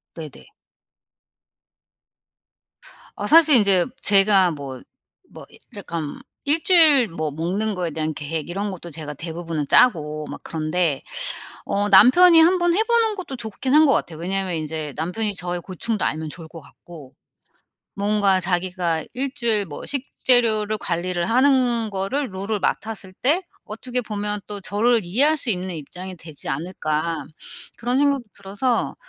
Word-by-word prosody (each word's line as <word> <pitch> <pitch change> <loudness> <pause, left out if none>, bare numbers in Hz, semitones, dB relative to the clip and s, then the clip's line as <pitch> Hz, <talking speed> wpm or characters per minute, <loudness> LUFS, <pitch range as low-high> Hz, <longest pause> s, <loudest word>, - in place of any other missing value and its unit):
네네. 155 - -10 2.7
아 - - -3
사실 315 -2 +7
인제 200 -5 +4 0.2
제가 195 -2 +5
뭐 140 -4 -8 0.5
뭐 - - -11
이 - - -17 0.2
약간 165 -6 -5 0.2
1 300 +3 +2
주일 310 -9 +6
뭐 155 -4 -4
먹는 185 +8 -2
거에 175 -2 -3
대한 155 0 -3
계획 155 +2 -5
이런 200 +3 -3
것도 175 -2 -8
제가 155 -2 -7
대부분은 165 -1 -5
짜고 155 - +3
막 - - -8
그런데 160 -2 -1 0.6
어 205 +1 -1
남편이 325 - +7
한번 350 +1 +4
해보는 450 0 +2
것도 365 -8 -7
좋긴 240 +2 -3
한 310 +1 +7
것 280 - +4
같아요. 165 -9 -2
왜냐하면 190 +1 -2
인제 155 -1 -4
남편이 190 +7 -2
저의 180 -1 -4
고충도 195 +4 -3
알면 155 0 -2
좋을 165 +1 -8
것 165 +1 -12
같고 150 -5 -15 0.8
뭔가 200 -1 +2
자기가 175 -2 -1
1 265 +2 -1
주일 225 -6 0
뭐 150 -5 -9
식재료를 235 -6 +1
관리를 175 0 -2
하는 250 -2 +2
거를 200 +5 -3
롤을 200 +3 -3
맡았을 215 -3 -3
때 295 - 0 0.2
어떻게 250 +4 -4
보면 210 -2 -3
또 205 -1 -7
저를 225 +4 +1
'이해할 265 - +2
수 275 -5 -4
있는 185 -3 -2
입장이 180 +5 -8
되지 160 -3 -12
않을까?' 160 0 -3 0.5
그런 245 +2 -1
생각도 280 -2 +2
들어서 205 +5 -2
195 Hz, 280 characters per minute, -22 LUFS, 165-245 Hz, 2.7 s, 사실